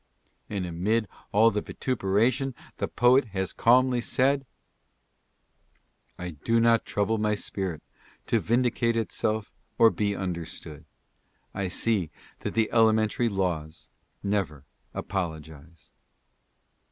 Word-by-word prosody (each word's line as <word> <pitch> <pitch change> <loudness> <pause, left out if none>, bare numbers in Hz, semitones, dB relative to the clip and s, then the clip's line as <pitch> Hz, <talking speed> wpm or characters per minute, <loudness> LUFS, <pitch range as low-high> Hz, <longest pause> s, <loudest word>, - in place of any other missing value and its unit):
And 100 -3 -2
amid 100 +6 0 0.2
all 110 +3 +5
the 105 - -1
vituperation 120 +4 0 0.2
the - - -1
poet 125 +2 +4
has 95 -1 -1
calmly 125 +1 +4
said: 135 +2 +1 0.8
" - - -46 0.7
I 90 0 -5
do 115 +10 0
not 115 0 +4
trouble 105 +2 0
my 105 0 +1
spirit 95 -5 -3 0.4
to - - +2
vindicate 120 0 +1
itself 110 -1 -1 0.3
or 115 -1 +7
be 100 -1 -1
understood, 85 -5 -5 0.7
I 100 -1 -2
see 95 -2 0 0.3
that - - -5
the 110 -1 +3
elementary 110 +1 +3
laws 90 -6 -3 0.3
never 95 -9 -1 0.3
apologize." 80 -4 -6
105 Hz, 110 wpm, -27 LUFS, 90-115 Hz, 0.8 s, or